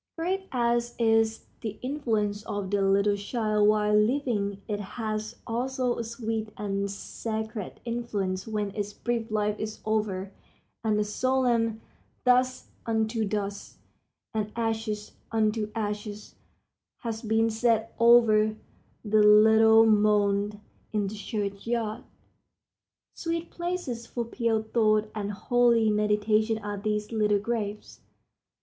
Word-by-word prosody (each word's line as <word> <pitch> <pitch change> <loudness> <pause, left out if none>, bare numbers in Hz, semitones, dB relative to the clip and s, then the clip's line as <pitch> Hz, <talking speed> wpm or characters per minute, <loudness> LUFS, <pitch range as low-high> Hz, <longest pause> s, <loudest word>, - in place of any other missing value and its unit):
Great 380 +3 -2
as 240 -1 0
is 225 -1 +2
the 215 -2 -5
influence 220 -7 -1
of 200 -2 -3
the 205 -1 +2
little 200 +1 +3
child 210 0 +1
while 210 0 +2
living 210 -3 +1
it 205 -1 -2
has 215 +2 -4
also 250 +1 -1
a - - -1
sweet 225 -1 -3
and 200 -1 -2
sacred 220 +1 -5
influence 210 -6 -2
when 210 -2 -2
its 205 -1 -4
brief 235 +1 -2
life 210 -1 0
is 215 0 -5
over 205 -3 -1 0.5
and 215 -2 +2
the 210 - +2
solemn 230 0 +1 0.4
"dust 255 +1 +3 0.2
unto 220 0 0
dust" 205 -1 -4 0.6
and 215 -1 -2
"ashes 220 -2 -2 0.2
unto 215 -1 +1
ashes" 210 -1 -4 0.7
has 225 -2 -4
been 225 0 +2
said 225 0 +1
over 225 -2 +5 0.5
the 215 0 +4
little 220 +1 +7
mound 210 -1 +2 0.3
in 210 -1 +1
the 200 +2 -4
church 200 0 -4
yard. 230 -2 -2 1.1
Sweet 335 0 -3
places 345 -10 -4
for 240 -1 -3
pure 230 -2 0
thought 215 -1 +2
and 205 -1 -3
holy 230 +1 +3
meditation 210 +1 +2
are 205 -1 -5
these 210 +1 -2
little 210 -2 +2
graves. 210 -1 -4
220 Hz, 120 wpm, -27 LUFS, 210-230 Hz, 1.1 s, little